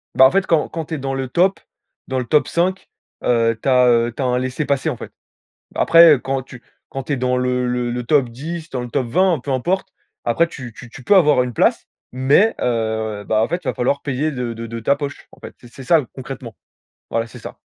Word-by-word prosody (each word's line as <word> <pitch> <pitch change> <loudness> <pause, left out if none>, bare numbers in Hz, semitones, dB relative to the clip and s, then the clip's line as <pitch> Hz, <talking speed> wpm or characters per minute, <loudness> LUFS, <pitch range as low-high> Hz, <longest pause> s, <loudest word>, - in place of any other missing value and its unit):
Bah, 130 - +8
en 130 - +6
fait, 195 0 +1
quand 160 -3 +2
quand 165 -1 -5
tu 160 - -4
es - - -4
dans 135 -1 -3
le 135 -1 -3
top 180 +9 +2 0.5
dans 130 - -2
le 125 - -1
top 150 +5 +2
5, 185 +3 -1 0.3
heu, 115 -1 +2
tu - - 0
as, 125 -1 +5
heu 120 -1 +3
tu - - -5
as - - 0
un 125 0 +1
laissez 130 +3 -3
passer 140 +2 0
en 135 - -4
fait. - - -9 0.6
Après, 165 -1 +7
heu, - - -5
quand 135 0 -3
tu 125 -2 -13 0.3
quand 135 - -5
tu 145 - -3
es - - -1
dans 125 0 0
le 125 0 0 0.2
le 120 +1 -3
top 135 0 +2
10, 160 +7 -7
dans 125 -5 -4
le 125 - -6
top 130 -1 -1
20, 180 +5 +2
peu 140 - -3
importe, 175 +9 -1 0.4
après 140 +9 +2
tu 130 -7 -9
tu 120 - -12
tu 125 - -12
peux 200 - +4
avoir 150 -8 +5
une 125 - -5
place. - - +1 0.2
Mais, 140 - +3
heu, 110 -3 -1
bah, 110 0 +2
en - - 0
fait, 175 - -1
il - - -7
va - - 0
falloir 140 +3 0
payer 145 +3 -1
de 125 -3 -4
de 115 0 -7
de 115 +1 -6
ta 140 +5 +2
poche. 145 0 -7
En - - -18
fait, - - -11
c'est 130 +3 -12
ça 150 0 +3
concrètement. 125 -4 -8 0.5
Voilà, 115 0 -1
c'est - - -12
ça. - - -9
130 Hz, 245 wpm, -20 LUFS, 120-150 Hz, 0.6 s, Bah